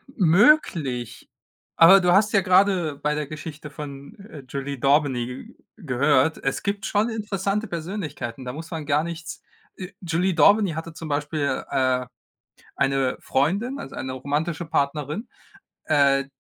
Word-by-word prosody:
Möglich. 170 - +2 0.5
Aber 185 +4 +8
du 180 -1 +2
hast 210 +2 +4
ja 200 - +4
grade 185 -4 +3
bei 150 +1 -1
der 150 -1 -3
Geschichte 155 0 -8
von, 140 +4 -9
äh, 195 -9 -12
Julie 140 +1 -5
d'Aubigny 135 - 0 0.2
gehört, 145 - +1
es 135 - -2
gibt 200 0 -2
schon 210 +3 +1
interessante 210 -1 -2
Persönlichkeiten, 160 - -5
da 125 - -5
muss 160 +4 -9
man 160 -3 -5
gar 145 +1 +1
nichts 170 0 -7 0.3
äh, 185 0 -8
Julie 180 +2 0
d'Aubigny 200 +3 +4
hatte 165 +1 -6
zum 165 0 -8
Beispiel, 145 -1 -1
äh, 130 -1 +1 0.7
eine 135 -1 +1
Freundin, 200 - 0
also - - -9
eine 130 - -4
romantische 145 +5 -3
Partnerin, 150 - -2 0.6
äh 140 -2 +3
155 Hz, 140 wpm, -24 LUFS, 140-190 Hz, 0.7 s, Aber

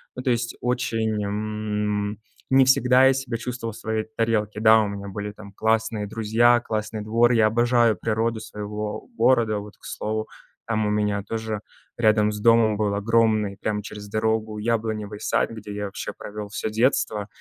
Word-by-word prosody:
Ну, 125 - -6
то 130 - 0
есть, 115 0 -2
очень, 115 -4 -1
м, 105 0 -2 0.3
не 135 0 +6
всегда 130 0 +5
я 135 - +5
себя 130 -3 -3
чувствовал 120 -1 -5
в - - -11
своей 110 -1 -2
тарелке. 105 -2 0
Да, 110 0 +6
у 105 - 0
меня 100 0 -6
были 105 +1 -5
там 100 -1 -13
классные 110 0 0
друзья, 115 +3 +3
классный 110 -1 -4
двор, 115 +3 +3
я 110 -2 +4
обожаю 120 0 +3
природу 110 +2 -1
своего 105 - -5
города. 115 -5 +3
Вот, 105 0 -11
к - - -18
слову, 110 0 -3 0.4
там 110 -2 0
у - - +1
меня 105 -1 0
тоже 110 -1 -4 0.4
рядом 110 -2 +3
с 105 - -5
домом 115 -1 +4
был 105 -2 0
огромный 110 -1 +2
прямо 105 +1 -2
через 105 -1 -9
дорогу 110 0 -1
яблоневый 110 -2 -2
сад, - - 0
где 105 -2 -8
я 105 0 -3
вообще 100 - -5
провел 105 0 -7
всё 110 - -3
детство, 110 -2 +1
110 Hz, 170 wpm, -24 LUFS, 105-115 Hz, 0.4 s, не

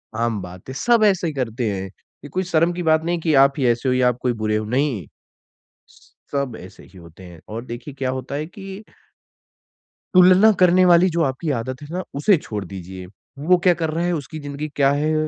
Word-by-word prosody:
आम 115 -2 -1
बात 90 +4 -11
है 130 - -5
सब 235 -2 +4
ऐसे 190 -4 +2
ही 155 - -3
करते 120 -4 -2
हैं। 95 -1 -4
ये 115 +8 -15
कोई 185 +6 -2
शर्म 165 +2 +3
की 180 - -4
बात 160 0 +3
नहीं 175 0 -1
कि 160 -1 0
आप 140 - 0
ही 135 - 0
ऐसे 120 +2 +1
हो 125 - +2
या 125 -1 +3
आप 120 - -3
कोई 125 -1 0
बुरे 110 0 +1
हो 110 - -3
नहीं। 125 - -1 1.3
सब 140 -5 -2
ऐसे 90 +1 -13
ही 95 0 -17
होते 85 +1 -15
हैं 85 -2 -13
और 115 +3 -6
देखिए 125 +3 -8
क्या 130 -2 -2
होता 130 +1 -5
है 150 +2 -3
कि 195 +4 -10 1.3
तुलना 185 +4 +7
करने 180 0 +5
वाली 175 +1 +5
जो 165 0 0
आपकी 140 +3 -2
आदत 130 +4 -6
है 145 - -9
ना 185 +1 -2
उसे 175 +7 +3
छोड़ 105 -9 -6
दीजिए। 95 0 -9 0.3
वो 170 +6 +3
क्या 180 - +6
कर 165 -2 -2
रहा 165 +2 -2
है, 175 - 0
उसकी 155 0 -6
ज़िंदगी 145 +1 -5
क्या 140 -1 +4
है? 150 +2 0
140 Hz, 220 wpm, -21 LUFS, 115-170 Hz, 1.3 s, तुलना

